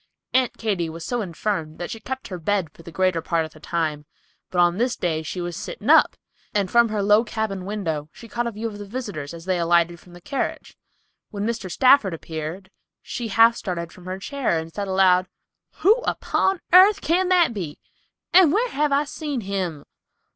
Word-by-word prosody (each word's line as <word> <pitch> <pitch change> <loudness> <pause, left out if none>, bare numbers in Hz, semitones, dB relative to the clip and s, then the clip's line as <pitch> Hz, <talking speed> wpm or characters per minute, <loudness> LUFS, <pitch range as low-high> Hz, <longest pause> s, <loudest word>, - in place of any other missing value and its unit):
Aunt 255 -2 +2
Katy 195 -7 -1
was 165 +1 -8
so 245 -1 -1
infirm 170 -4 -3
that 175 - -5
she 225 - -6
kept 260 +4 -6
her 180 -2 -5
bed 185 -2 -1
for - - -16
the 170 - -11
greater 185 0 +1
part 165 0 0
of 155 - -12
the 155 - -15
time, 155 -3 -2 0.4
but 180 - -5
on 175 +2 +3
this 245 +1 +1
day 160 -3 -1
she 160 +3 -5
was 175 -1 -4
sitting 210 - -2
up, 320 - +6 0.4
and 200 -3 +1
from 235 -1 +5
her 210 -2 -1
low 210 +3 +5
cabin 220 -5 -3
window 165 -8 -3
she 230 - -13
caught 240 +2 -2
a - - -2
view 220 +1 -6
of 210 -2 -4
the 205 - -7
visitors 205 - -5
as 170 0 -10
they 185 -2 0
alighted 170 0 +2
from 175 +2 -18
the 175 - -12
carriage. 275 +8 -4 0.5
When 205 -1 -4
Mr. 225 -4 -3
Stafford 255 -6 +4
appeared, 165 +4 -7 0.3
she 240 - -4
half 225 +3 +5
started 170 -6 -4
from 180 - -15
her 185 +1 -4
chair 250 - -1
and 160 0 -6
said 205 -1 -3
aloud, 185 -1 +4 0.5
"Who 405 - +7
upon 385 -6 0
airth 390 +3 +7
can 360 +3 +1
that 350 -8 +4
be, 170 -8 -5 0.6
and 355 -4 +7
whar 465 +8 +1
have 295 -4 0
I 280 +1 +3
seen 295 -3 -4
him? 185 -7 -3
195 Hz, 205 wpm, -23 LUFS, 170-235 Hz, 0.6 s, Who